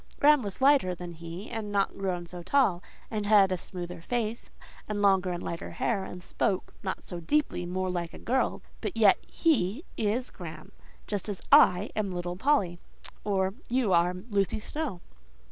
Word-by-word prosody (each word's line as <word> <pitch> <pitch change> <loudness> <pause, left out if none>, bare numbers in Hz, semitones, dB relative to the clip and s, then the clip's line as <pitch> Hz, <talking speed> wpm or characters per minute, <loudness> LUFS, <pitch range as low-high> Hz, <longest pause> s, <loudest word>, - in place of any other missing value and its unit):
Graham 295 -1 +6
was 200 -4 -5
slighter 265 -10 +4
than 175 0 -7
he, 170 +4 -8
and 215 -2 -4
not 200 -1 +1
grown 185 -3 -2
so 175 +1 -8
tall, 190 -3 +2 0.3
and 210 -2 -2
had 200 -3 +6
a - - +2
smoother 175 -1 -7
face, 230 +3 -2 0.4
and 210 -1 -1
longer 195 -2 +4
and 175 - -4
lighter 170 - -4
hair, 200 -5 0
and 180 0 -8
spoke—not 190 -1 -2
so 175 - -4
deeply—more 185 - 0
like 175 -2 -3
a - - -8
girl; 260 +3 0 0.2
but 375 - -4
yet 205 -4 +6
he 280 - +1
is 230 +4 0
Graham, 160 -4 -9 0.3
just 205 0 -3
as 200 - -3
I 180 +4 +6
am 210 -3 -1
little 175 0 -3
Polly, 190 -7 +1 0.4
or 190 -2 +1 0.2
you 240 -5 +2
are 175 +1 +3 0.2
Lucy 200 +1 +1
Snowe." 260 - -4
195 Hz, 165 wpm, -29 LUFS, 180-220 Hz, 0.4 s, Graham